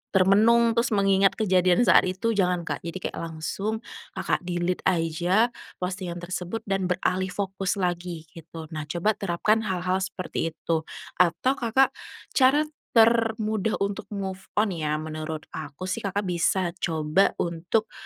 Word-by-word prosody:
termenung 220 +5 +5
terus 235 -1 +1
mengingat 195 0 +3
kejadian 185 0 +3
saat 185 - +5
itu 190 +5 -1
jangan 180 -4 +1
Kak - - -3
jadi 170 +2 -5
kayak - - -7
langsung 195 +7 -4 0.3
Kakak - - 0
delete 175 +1 -1
aja 175 +6 +2 0.3
postingan 180 -2 -4
tersebut 180 +5 -4
dan 195 -3 -1
beralih 185 +1 0
fokus 195 0 -2
lagi 175 -3 -2
gitu 165 -2 -10
nah 155 -1 -5
coba 175 +7 0
terapkan 200 +4 +1
hal-hal 185 0 0
seperti 185 -3 -3
itu 160 -1 -2 0.3
atau 180 +9 +3
Kakak 250 +3 +3 0.4
cara 270 +3 +4 0.3
termudah 220 -2 +3
untuk 200 +1 -3
move 195 -2 -5
on 210 -1 +2
ya 155 -3 -1
menurut 155 0 -5
aku 155 +2 -7
sih 185 0 -2
Kakak 200 +1 -2
bisa 180 0 +1
coba 160 +2 +1
untuk, 175 +6 -1
185 Hz, 140 wpm, -26 LUFS, 170-210 Hz, 0.4 s, termenung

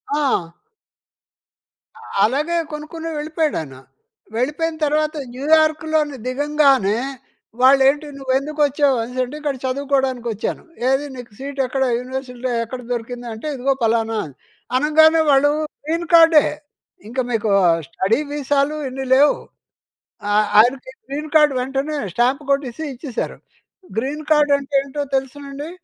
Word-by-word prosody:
ఆ! 260 - 0 1.7
అలాగే 295 +9 +1 0.2
కొనుక్కుని 320 +2 -6
వెళ్ళిపోయాడు 310 +1 -1
ఆయన. 135 -4 -10 0.6
వెళ్ళిపోయిన 300 +6 -1
తర్వాత 305 +1 0 0.2
న్యూయార్క్‌లోని 310 +1 +2
దిగంగానే, 275 -6 +2 0.6
వాళ్ళు 270 +1 +6
ఏంటి? 295 +2 -2
"నువ్వు 265 -1 -2
ఎందుకు 300 +2 -7
వచ్చావు" 285 -2 +2
అనేసి 250 +2 -6
అంటే, 255 +4 -7
"ఇక్కడ 290 -2 -1
చదువుకోవడానికి 265 -2 -1
వచ్చాను". 210 - -4 0.3
"ఏది 270 +2 +1
నీకు 245 -3 -10
సీట్ 275 +1 -7
ఎక్కడ? 265 +1 0 0.2
యూనివర్సిటీలో 255 -1 -5
ఎక్కడ 250 +2 -7
దొరికింది?" 245 +1 -5
అంటే, 220 +7 -7
"ఇదిగో 270 +1 +1
పలానా" 225 0 +1
అని 140 -4 -12 0.4
అనగానే, 315 +3 +5
వాళ్ళు 280 +1 +4 0.4
గ్రీన్ 335 +2 -1
కార్డే. 325 -2 +7 0.6
ఇంకా 250 +4 -2
మీకు 220 -2 0 0.4
స్టడీ 195 +8 0
వీసాలు 290 0 0
ఇన్ని 265 +1 -5
లేవు. 285 +2 +5 0.9
ఆహ్, 210 0 +3
ఆయనకి 255 +3 +3 0.2
గ్రీన్ 295 +3 -5
కార్డ్ 300 -2 +6
వెంటనే 270 +4 -2 0.2
స్టాంప్ 250 +6 +1
కొట్టేసి 275 +1 -1
ఇచ్చేసారు. 255 -1 -5 0.6
గ్రీన్ 285 +6 -2
కార్డ్ 300 -1 +4
అంటే 280 0 -10
ఏంటో 280 +1 -4
తెలుసా 270 +2 -3
అండీ? 285 +3 -6
275 Hz, 125 wpm, -20 LUFS, 250-300 Hz, 1.7 s, కార్డే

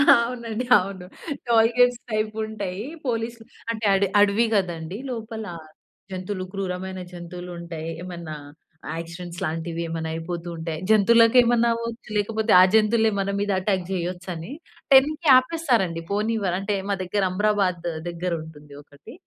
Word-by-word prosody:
అవునండి 235 0 -2
అవును. 190 -1 -4 0.4
Toll 225 -1 +5
gates 245 -1 +4
టైపుంటయ్యి. 215 -1 -3 0.2
పోలీస్‌లు 230 -1 -3 0.3
అంటే 220 -1 -4
అడ 195 - +2 0.2
అడవి 205 +3 +4
కదండీ! 175 -2 -2
లోపల 225 -2 -5 0.7
జంతువులు 185 0 -4
క్రూరమైన 190 -1 -4
జంతువులుంటాయి. 170 -2 -7
ఏమన్నా 170 -4 -7 0.6
యాక్సిడెంట్స్ 170 +1 -7
లాంటివి 165 +1 -3
ఏమన్నా 160 -1 -3
అయిపోతూ 170 +1 -5
ఉంటాయి. 160 -1 -4
జంతువులకేమన్నా 235 +2 +5
అవ్వచ్చు, 230 0 -6
లేకపోతే 220 +1 0
ఆ - - +9
జంతువులే 220 +1 +4
మన 195 0 -1
మీద 205 0 0
అటాక్ 190 -1 0
జేయొచ్చని. 180 +1 -4 0.4
10కి 300 +4 +5
ఆపేస్తారండి 250 - +1
పోనివ్వర్ 210 -3 0
అంటే 200 +1 -1
మా 200 - +2
దగ్గర 195 +2 -1
అమ్రాబాద్ 190 -3 +1 0.2
దెగ్గరుంటుంది 160 -4 -5
ఒకటి. 145 - -15
200 Hz, 120 wpm, -24 LUFS, 175-225 Hz, 0.7 s, ఆ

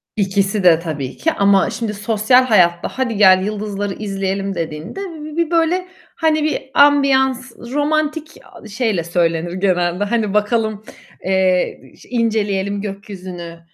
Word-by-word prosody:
İkiside 195 -3 +2
tabii 150 -6 -5
ki 325 - +1
ama, 200 -1 +3
şimdi, 225 -1 -4
sosyal 215 +4 +3
hayatta 175 -7 +3
"Hadi 250 -4 -2
gel 190 -2 +6
yıldızları 205 -1 -3
izleyelim." 195 -1 -3
dediğinde 165 - -5
bir 350 -5 -7
bir 310 - -10
bir 335 -1 0
böyle, 340 +2 +1 0.3
hani, 310 -2 +1
bir 305 -2 -1
ambiyans 265 -3 +3
romantik 305 +4 -2
a - - -14
şeyle 210 -5 -1
söylenir 170 0 -1
genelde, 180 0 0
hani, 210 -1 -1
bakalım, 215 0 0 0.4
eee, 185 -1 +1 0.2
i - - -18
inceleyelim 205 -4 -1
gökyüzünü, 185 -4 -8
205 Hz, 130 wpm, -18 LUFS, 190-255 Hz, 0.4 s, gel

